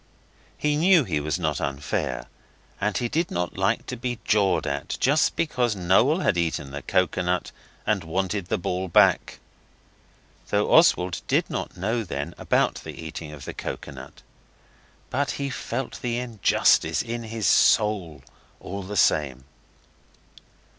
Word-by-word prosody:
He 150 0 +1
knew 175 0 +5
he 85 -10 -1
was 75 +1 -2
not - - -1
unfair, 70 +1 -2 0.6
and 105 -1 0
he 120 - 0
did 165 +7 -1
not 90 0 -3
like - - 0
to 125 - -5
be 120 0 -3
jawed 100 -4 +2
at 70 +2 -3
just 145 +4 +3
because 125 -8 0
Noel 100 - +3
had 90 - +1
eaten 80 -4 -2
the 70 +1 -6
coconut 90 0 0 0.3
and 105 -4 +1
wanted 95 +3 -2
the - - 0
ball 90 +1 -2
back. 85 - +3 1.1
Though 105 0 +1
Oswald 90 - +4
did - - +1
not - - -4
know 110 +5 -1
then 75 -3 -5
about - - +1
the - - -9
eating 80 -1 -7
of 75 -3 -10
the - - -6
coconut, - - -8 0.9
but 140 +2 0
he 140 -1 -3
felt 120 +1 -4
the 120 -1 -1
injustice 120 -4 +2
in 120 0 -4
his 110 -1 -4
soul 90 -10 +3 0.4
all 100 +2 -6
the 100 +2 -5
same. 70 -6 +2
100 Hz, 145 wpm, -25 LUFS, 85-120 Hz, 1.1 s, knew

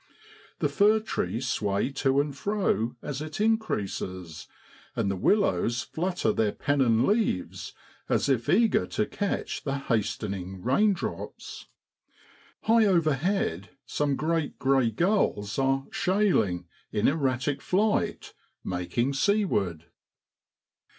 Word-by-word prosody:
The - - +1
fir 210 +2 +4
trees 125 - -3
sway 100 +4 0
to 135 0 +1
and 145 -1 -1
fro 185 - 0
as 145 -1 -4
it 155 +5 -6
increases, 95 - -2 0.5
and 100 - 0
the - - -2
willows 120 - +2
flutter 175 - -1
their 105 -2 +1
pennon 130 -6 +2
leaves 205 - -1 0.4
as - - +2
if 130 -4 0
eager 220 +2 +3
to 215 - -1
catch 205 -2 -3
the 140 -1 -1
hastening 100 -7 -3
raindrops. 190 - -1 1.0
High 225 0 +4
over 165 -6 +3
head 135 - -1 0.2
some 145 -2 0
great 160 +1 -1
grey 135 -3 +3
gulls 115 - 0
are 135 0 +1
' - - -32
shay 195 +1 +2
ling 90 -4 0
' - - -37
in 105 0 +1
erratic 135 -2 0
flight, 210 +3 0 0.3
making 90 +9 -1
seaward. 135 - +1
135 Hz, 120 wpm, -27 LUFS, -, 1.0 s, fir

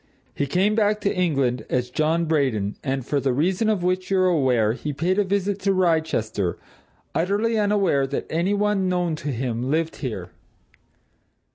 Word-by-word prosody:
He 140 - -2
came 190 +8 +2
back 210 -1 +2
to 200 - 0
England 135 -10 0
as 125 -1 -1
John 160 +4 +1
Braden, 130 -11 0
and, 135 -2 -2
for 145 +1 0
the 135 -2 0
reason 180 - +1
of 205 -5 0
which 185 +1 0
you're 190 -1 +3
aware, 130 -11 +2
he 145 +4 -4
paid 175 +8 0
a - - +4
visit 200 0 -1
to 195 0 +1
Wrychester, 160 - 0 0.6
utterly 210 +6 +1
unaware 200 -10 +2
that 140 - -3
any 175 +5 0
one 205 -2 +1
known 175 -3 0
to 150 - -7
him 125 0 -2
lived 160 +2 0
here. 100 - -5
165 Hz, 165 wpm, -23 LUFS, 130-190 Hz, 0.6 s, a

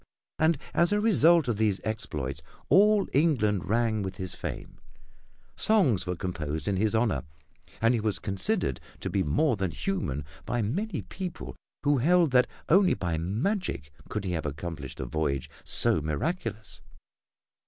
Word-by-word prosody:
And 160 0 +3 0.2
as 170 +2 +3
a 205 - +3
result 170 - +5
of 115 -4 0
these 105 -3 +1
exploits 75 -10 -3 0.3
all 205 +1 +5
England 110 - +2
rang 110 -1 +1
with 95 -1 -4
his 95 -1 -3
fame, - - -7 0.8
songs 135 - +3
were 90 - -1
composed 80 -4 -4
in 100 - +1
his 105 +3 +1
honor 110 -2 +1 0.6
and 115 +2 +4
he 120 - +1
was 105 -1 -1
considered 100 - -1 0.2
to - - -3
be 100 - +1
more 115 - +2
than 95 -2 -1
human 85 - -3 0.2
by 120 -2 -1
many 195 - -2
people 180 -3 -6 0.3
who 145 -2 +3
held 170 +3 +4
that 125 0 +5 0.2
only 185 +2 +5
by 85 -3 -2
magic 110 - -2 0.2
could 105 - -3
he 90 - -1
have 80 -3 -2
accomplished 75 -2 -6
a - - -3
voyage 75 -4 -2
so 80 - +1
miraculous. 110 - -3
110 Hz, 155 wpm, -28 LUFS, -, 0.8 s, result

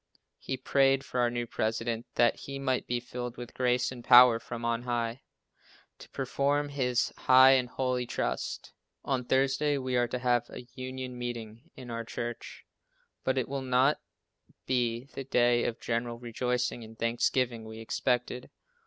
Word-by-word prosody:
He 130 - -4
prayed 135 +1 +2
for 125 - -3
our 120 -1 +3
new 120 0 -2
President, 115 +1 -2
that 120 -1 +4
he 140 0 -7
might 130 -2 -1
be 120 0 0
filled 120 0 -6
with 120 -1 -8
grace 125 0 +1
and 125 -2 -9
power 120 -2 +8
from 115 0 -6
on 115 0 0
High, 120 0 -2 0.8
to - - -13
perform 140 +2 0
his 125 -3 0
high 130 +1 +7
and 130 -2 +3
holy 125 -1 -1
trust. - - -3 0.3
On 130 -2 0
Thursday 135 +3 +1
we 130 -1 -2
are 120 0 +2
to 125 - -3
have 120 -1 +1
a 125 - -9
union 130 -1 -6
meeting 115 -1 -6
in 125 -2 -9
our 115 0 -3
church, 120 +1 -6 0.6
but 130 0 0
it 130 - 0
will 140 0 -3
not 130 +3 +2 0.6
be 120 -2 0
the 135 - -5
day 120 -2 +3
of 115 - -2
general 115 0 -2
rejoicing 125 0 -2
and 110 0 -12
thanksgiving 120 0 0
we 110 0 -9
expected. 125 +2 -2
125 Hz, 160 wpm, -29 LUFS, 120-130 Hz, 0.8 s, power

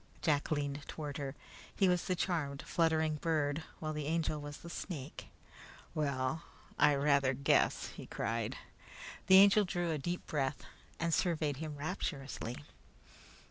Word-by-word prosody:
Jack 145 -3 +2
leaned 145 -1 -1
toward 150 -3 -5
her. 140 -1 -4 0.4
He 195 - +4
was 180 -1 +2
the 185 - +1
charmed 155 -6 -1
fluttering 160 -2 +2
bird, 150 -2 0 0.2
while 155 -1 -3
the 150 -1 -3
Angel 155 -2 0
was 145 0 -7
the 170 - -10
snake. 155 -7 -6 0.7
"Well, 140 0 0 0.4
I 150 -1 +6
rather 140 -2 +3
guess!" 140 +2 +2
he - - -10
cried. - - -2 0.7
The 190 - +9
Angel 200 +2 +8
drew 175 -2 -1
a 155 - -1
deep 175 +5 -3
breath 135 -2 -1 0.4
and 170 0 0
surveyed 155 -6 +1
him 155 0 -5
rapturously. 140 -6 -4
150 Hz, 140 wpm, -34 LUFS, 140-170 Hz, 0.7 s, The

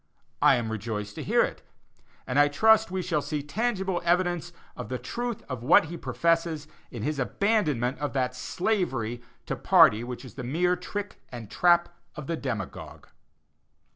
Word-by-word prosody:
I - - +6
am 115 -2 -2
rejoiced 105 -1 -4
to - - -6
hear - - +3
it, - - -4 0.6
and 125 +3 +1
I 145 - +6
trust 220 +9 +4
we 185 0 -2
shall 165 -4 0
see 150 0 -3
tangible 190 +1 -1
evidence 175 0 +1 0.2
of - - -7
the 130 - -2
truth 240 - -4
of 130 -4 -5
what 150 +4 +5
he - - -4
professes 165 -2 0 0.2
in 120 -4 -7
his 150 0 -2
abandonment 150 - 0
of 145 0 -3
that 125 -2 -1
slavery 130 - -1 0.2
to - - -2
party 110 +2 +5
which 125 +2 -7
is 120 - -11
the 130 - -7
mere 175 +8 +1
trick 205 +3 -6
and 115 -4 -9
trap 175 -1 +4 0.3
of 150 - -7
the 165 - -2
demagogue. 120 - -6
150 Hz, 170 wpm, -27 LUFS, 125-180 Hz, 0.6 s, I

